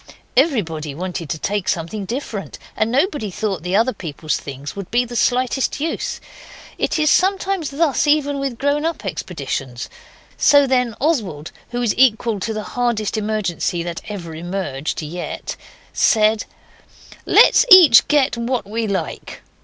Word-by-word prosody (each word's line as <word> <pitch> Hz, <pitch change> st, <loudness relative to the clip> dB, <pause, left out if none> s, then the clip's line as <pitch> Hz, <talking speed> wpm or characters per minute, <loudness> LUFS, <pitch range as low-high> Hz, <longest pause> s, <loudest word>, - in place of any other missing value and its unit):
Everybody 170 Hz, -, 0 dB
wanted 175 Hz, -2 st, -5 dB
to -, -, -2 dB
take 195 Hz, +4 st, -2 dB
something 180 Hz, +5 st, -3 dB
different, 225 Hz, -2 st, -5 dB, 0.2 s
and 220 Hz, +1 st, 0 dB
nobody 280 Hz, -, 0 dB
thought 195 Hz, -2 st, -3 dB
the 180 Hz, +3 st, -2 dB
other 230 Hz, +5 st, +2 dB
people's 155 Hz, -2 st, -4 dB
things 140 Hz, +1 st, -8 dB
would 200 Hz, -2 st, -7 dB
be 245 Hz, +1 st, +2 dB
the 240 Hz, 0 st, -8 dB
slightest 255 Hz, +3 st, +1 dB
use. 315 Hz, +2 st, -3 dB, 0.6 s
It -, -, 0 dB
is 305 Hz, -1 st, +3 dB
sometimes 380 Hz, -3 st, +1 dB
thus 295 Hz, 0 st, +1 dB
even 290 Hz, -1 st, +2 dB
with 270 Hz, -4 st, -3 dB
grown 285 Hz, +3 st, 0 dB
up 325 Hz, -8 st, -3 dB
expeditions. 135 Hz, -9 st, -5 dB, 0.5 s
So 285 Hz, -1 st, +5 dB
then 250 Hz, -4 st, +1 dB
Oswald, 205 Hz, -, -1 dB, 0.2 s
who 245 Hz, 0 st, -3 dB
is 225 Hz, -, +1 dB
equal 230 Hz, -4 st, +3 dB
to 215 Hz, +4 st, -3 dB
the 215 Hz, -1 st, -4 dB
hardest 235 Hz, -1 st, -1 dB
emergency 210 Hz, -5 st, -2 dB
that 170 Hz, -1 st, -5 dB
ever 180 Hz, -6 st, -6 dB
emerged 160 Hz, -4 st, -4 dB
yet, 170 Hz, +4 st, -5 dB, 0.4 s
said 215 Hz, -1 st, +3 dB, 0.8 s
'Let's -, -, +6 dB
each 340 Hz, -, +9 dB
get 285 Hz, -3 st, +2 dB
what 235 Hz, -2 st, -2 dB
we 225 Hz, +2 st, -2 dB
like. 200 Hz, -2 st, -4 dB
220 Hz, 145 wpm, -20 LUFS, 180-270 Hz, 0.8 s, each